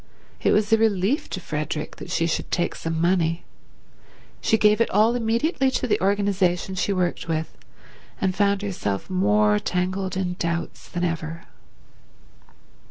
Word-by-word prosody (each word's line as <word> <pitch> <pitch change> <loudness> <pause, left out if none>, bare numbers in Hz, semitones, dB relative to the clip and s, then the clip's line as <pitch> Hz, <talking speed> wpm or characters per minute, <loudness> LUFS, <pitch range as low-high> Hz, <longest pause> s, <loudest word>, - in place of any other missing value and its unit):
It - - +3
was 210 +1 +2
a 225 - +5
relief 220 - +1
to - - -4
Frederick 150 -2 -4
that - - -9
she 165 - +1
should 165 - -2
take 175 - 0
some 165 0 -3
money. 170 -1 +1 1.0
She 220 - +3
gave 210 +1 +4
it - - +3
all 215 +4 +4
immediately 245 +5 +1
to - - -2
the 240 - +1
organization 195 -2 +1
she 190 +2 -1
worked 180 -2 -1
with, 160 -1 -2 0.6
and 190 -1 +1
found 200 0 +2
herself 105 - -3
more 105 +3 +3
tangled 185 - -2
in 180 -1 -2
doubts 170 0 -3
than 175 -1 -3
ever. 165 -1 -3
185 Hz, 150 wpm, -24 LUFS, 165-205 Hz, 1.0 s, a